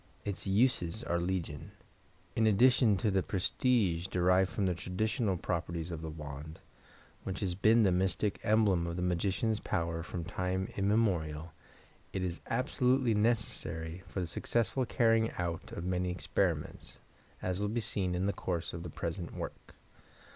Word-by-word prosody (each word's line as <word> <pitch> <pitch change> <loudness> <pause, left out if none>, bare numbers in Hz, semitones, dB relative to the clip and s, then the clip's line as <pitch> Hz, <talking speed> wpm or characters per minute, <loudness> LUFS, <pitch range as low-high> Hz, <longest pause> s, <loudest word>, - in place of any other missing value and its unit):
Its 100 -1 -4
uses 105 -2 +2
are 85 - 0
legion. 85 -5 -3 0.6
in 110 -1 +3
addition 115 0 +5
to 105 +1 +1
the 95 0 +2
prestige 95 -2 +1
derived 90 +1 +3
from 100 - 0
the 90 - +2
traditional 100 +4 -1
properties 85 0 -3
of 80 -2 -5
the 80 - -4
wand, 75 0 -8 0.6
which 95 0 -4
has 95 -3 0
been 110 +5 +5
the 95 - +4
mystic 95 +3 +1
emblem 105 -6 +3
of 85 - -3
the 90 - -2
magician's 100 +5 +1
power 85 -3 -1
from 85 +1 -5
time 90 +2 -2
immemorial, 90 -7 +1 0.6
it 95 - -1
is 90 -2 -3
absolutely 125 0 +2
necessary 105 -6 -1
for 95 - -4
the - - -1
successful 120 - 0
carrying 115 -2 +3
out 85 -2 -3
of 85 - -5
many 90 0 0
experiments, 90 0 -2 0.5
as 90 0 -1
will 105 - 0
be 115 +3 -1
seen 100 -5 -1
in 90 +2 0
the 100 - +1
course 85 -3 -3
of 85 - -5
the 85 - -6
present 85 +2 -4
work. - - -7
95 Hz, 155 wpm, -32 LUFS, 85-110 Hz, 0.6 s, addition